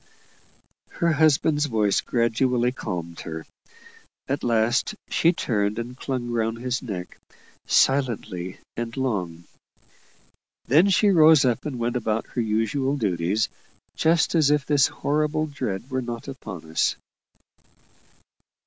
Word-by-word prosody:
Her 170 0 +1
husband's 155 0 +3
voice 105 -5 +1
gradually 120 +1 +1
calmed 85 -8 -6
her. 80 -1 -6 0.8
At 140 +1 -2
last, 120 - +1 0.2
she 165 - +4
turned 105 - -1
and 120 +2 -5
clung 125 -2 -4
round 115 -1 -1
his 125 +1 -2
neck, 95 -8 -7 0.5
silently 110 -9 +1 0.2
and 115 +1 -5
long. 90 -11 -2 1.2
Then 160 +10 +4
she 200 +2 +4
rose 155 -4 +6
up 125 +3 0
and 135 -4 -4
went 120 +1 -1
about 110 -1 -1
her 120 - -2
usual 115 +6 0
duties, 100 -1 0 0.5
just 160 +1 +2
as 155 -4 +4
if 150 -1 +2
this 145 -2 +4
horrible 150 +2 -1
dread 125 -7 -4
were 130 0 -1
not 120 0 -6
upon 90 - -8
us. 80 - +1
120 Hz, 120 wpm, -24 LUFS, 110-145 Hz, 1.2 s, rose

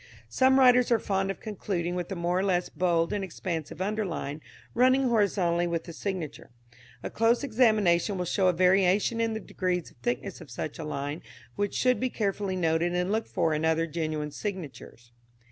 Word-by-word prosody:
Some 260 - +4
writers 250 -2 +5
are 235 - +5
fond 195 -2 -1
of 195 - -4
concluding 185 -5 -3
with 180 +1 -4
a - - -2
more 175 +1 0
or - - 0
less 180 -2 0
bold 170 -2 +1
and 205 -1 -2
expansive 170 -2 -4
underline 190 -8 -3 0.3
running 255 +2 +4
horizontally 185 -6 +2
with 170 -1 -2
the 170 - -9
signature. 180 -4 -5 0.5
A - - -4
close 230 +4 +2
examination 215 -7 +2
will 180 - -2
show 185 +2 +1
a - - +5
variation 190 +5 +3
in 225 -1 0
the - - -3
degrees 180 -4 -3
of - - -25
thickness 120 +1 -3
of - - -12
such 140 +7 -5
a - - -4
line, 145 +1 -4 0.3
which 205 0 -2
should 250 -3 +2
be 255 - 0
carefully 200 -4 -2
noted 170 0 +1
and 180 +2 0
looked 220 +1 -1
for 165 -3 +1
in 155 +1 -1
other 160 0 +2
genuine 155 -2 -3
signatures. 150 - -7
185 Hz, 185 wpm, -28 LUFS, 165-210 Hz, 0.5 s, writers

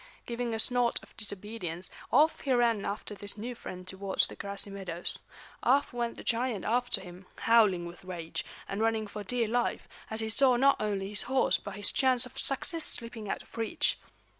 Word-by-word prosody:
Giving 240 0 -3
a - - -2
snort 245 +1 +3
of - - -18
disobedience, 200 -4 -3 0.2
off 305 +5 +4
he 275 - -2
ran 235 -4 +2
after 210 +1 -4
this 205 +1 -5
new 240 +4 -5
friend 185 -5 -9
towards 190 +1 +3
the - - -6
grassy 200 0 -3
meadows. 180 -3 -5 0.4
Off 275 +2 +2
went 235 -1 -2
the - - -9
giant 235 -4 -1
after 245 +2 +1
him, 180 0 -12
howling 210 -7 +4
with 170 +2 -10
rage, 175 -3 -4 0.2
and 195 +2 -3
running 225 -1 +1
for 210 0 -7
dear 235 +2 0
life, 240 +2 -1 0.2
as 220 - -1
he 220 0 -1
saw 255 +3 +6
not 275 +3 +4
only 200 -2 -1
his 210 - 0
horse 265 0 +3
but 200 - -8
his 205 0 +2
chance 260 -3 +5
of 250 - -12
success 320 +4 +1
slipping 230 -3 -3
out - - -3
of - - -19
reach. 225 -1 +1
220 Hz, 190 wpm, -30 LUFS, 195-245 Hz, 0.4 s, saw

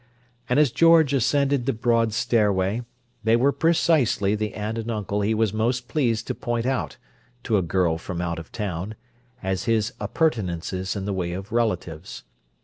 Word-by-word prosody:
And 125 - +2
as 150 -5 +4
George 165 -3 +5
ascended 140 0 +1
the 135 - +2
broad 115 -1 +1
stairway, 105 -2 +1 0.4
they 110 0 +4
were 130 +4 +3
precisely 155 -11 +2
the 105 0 -2
aunt 110 +2 -3
and 115 +1 -5
uncle 105 -2 -2
he 110 +2 +1
was 110 -2 +1
most 120 +3 0
pleased 115 -7 0
to - - -2
point 120 -1 -2
out, 130 -1 -2 0.5
to 110 - 0
a 100 - +3
girl 85 -1 +1
from 85 +1 -5
out 85 -1 -2
of 80 - -11
town, 100 -1 -4 0.5
as 95 -1 -2
his 115 +1 +1
appurtenances 95 - -1
in 95 -1 -4
the 100 - -2
way 90 -2 -2
of 95 +4 -7
relatives. 90 -8 -2
110 Hz, 170 wpm, -24 LUFS, 95-125 Hz, 0.5 s, George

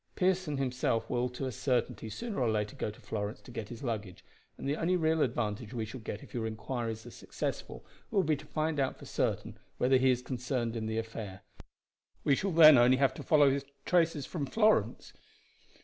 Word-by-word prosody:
Pearson 185 -5 +1
himself 125 -4 0
will, 125 0 +1
to 125 +2 -5
a 130 - -2
certainty, 120 -2 -1
sooner 230 - -4
or 120 - +2
later, 105 -1 -1
go - - -2
to 105 +4 -11
Florence 105 -2 -4
to 125 - -13
get 110 -3 -6
his 120 +2 -8
luggage, 105 -7 -4 0.3
and - - -5
the 140 - +1
only 170 +4 +1
real 160 -1 +2
advantage 115 -1 -1
we 115 -2 -2
shall 110 +4 -8
get 105 -2 -6
if - - -15
your 115 -2 -2
inquiries 110 0 -4
are - - -9
successful - - -5 0.2
will 195 - +2
be 155 -1 +2
to - - -11
find 155 -1 -1
out 135 -1 0
for - - -12
certain - - -2 0.2
whether 130 +1 +4
he 130 +1 +3
is 125 -1 +1
concerned 125 -2 -2
in 110 -1 -3
the 110 0 -2
affair. 110 -4 -5 0.8
We 140 - +4
shall 195 - -1
then 155 -5 +9
only 125 +2 +5
have 135 -1 +3
to - - -8
follow 145 -3 +5
his 140 0 -1 0.2
traces 165 -5 +2
from 150 -6 -4
Florence." 210 - +2
125 Hz, 205 wpm, -31 LUFS, 115-150 Hz, 0.8 s, then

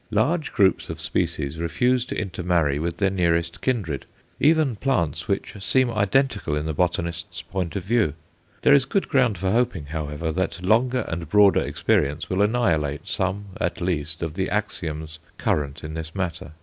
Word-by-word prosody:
Large 150 +9 +1
groups 95 -2 +2
of - - -5
species 75 +1 -2
refuse 125 +9 +1
to - - -3
inter 95 -3 -4
marry 85 -5 +2
with 85 +1 -2
their 100 -2 +2
nearest 85 -2 0
kindred, 100 - -1 0.3
even 150 -4 +3
plants 100 - -1
which - - -2
seem 130 +1 +3
identical 105 - +1
in 75 0 -2
the 80 - -2
botanist's 85 0 -2
point 90 -4 -3
of 100 - -2
view. 105 - +1 0.5
There - - +6
is 140 -2 +5
good 195 +8 0
ground 125 - +3
for 95 +2 0
hoping, 110 -9 +1
however, 75 +1 -3
that 95 +1 -2
longer 125 +5 +3
and 85 -2 -4
broader 100 +1 +5
experience 75 +6 0
will 95 +2 +1
annihilate 85 -10 +1
some 100 +2 -1
at - - -1
least 85 -2 -2
of 80 -2 -3
the 95 +2 -1
axioms 80 -7 -3 0.2
current 70 -1 -1
in 80 0 -6
this 80 +1 -6
matter. 90 -4 -4
90 Hz, 170 wpm, -24 LUFS, 80-110 Hz, 0.5 s, There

